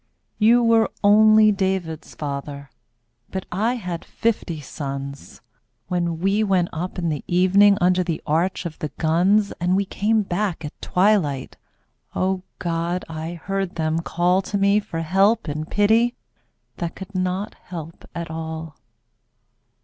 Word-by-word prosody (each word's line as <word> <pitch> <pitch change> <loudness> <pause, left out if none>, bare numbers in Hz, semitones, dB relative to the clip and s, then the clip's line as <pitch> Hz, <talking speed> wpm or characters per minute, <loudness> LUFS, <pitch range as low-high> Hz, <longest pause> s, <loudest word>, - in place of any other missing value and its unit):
You 235 +3 +5
were, 230 -1 +4
only 215 +1 +6
David's 190 -5 -2
father, 140 -1 -5 0.6
But 190 -1 -4
I 220 +7 0
had 180 -7 -5
fifty 210 -8 -2
sons 140 -1 -7 0.5
When 170 -2 -1
we 195 +4 +2
went 185 -4 +2
up 180 +4 -4
in 170 -2 -1
the 150 -3 -3
evening 195 +3 +5
Under 180 -1 +3
the 170 -3 -2
arch 170 +5 0
of 160 -3 -6
the 155 - -2
guns, 185 +6 +3
And 180 +1 +2
we 200 +1 +1
came 215 +3 +1
back 185 -3 -2
at 150 - -5
twilight 180 -9 +1 0.3
— - - -38
O 190 0 0 0.2
God! 170 +1 -2
I 160 +2 -5
heard 195 +2 -3
them 160 0 0
call 175 +2 +1
To 200 +1 -3
me 200 +1 +4
for 185 -6 -5
help 195 +6 +2
and 155 +2 -4
pity 225 +4 +3 0.6
That 170 -1 -4
could 195 +1 -9
not 185 +2 -2
help 165 -2 -9
at 170 -1 -5
all. 160 -1 -6
180 Hz, 145 wpm, -22 LUFS, 160-200 Hz, 0.6 s, only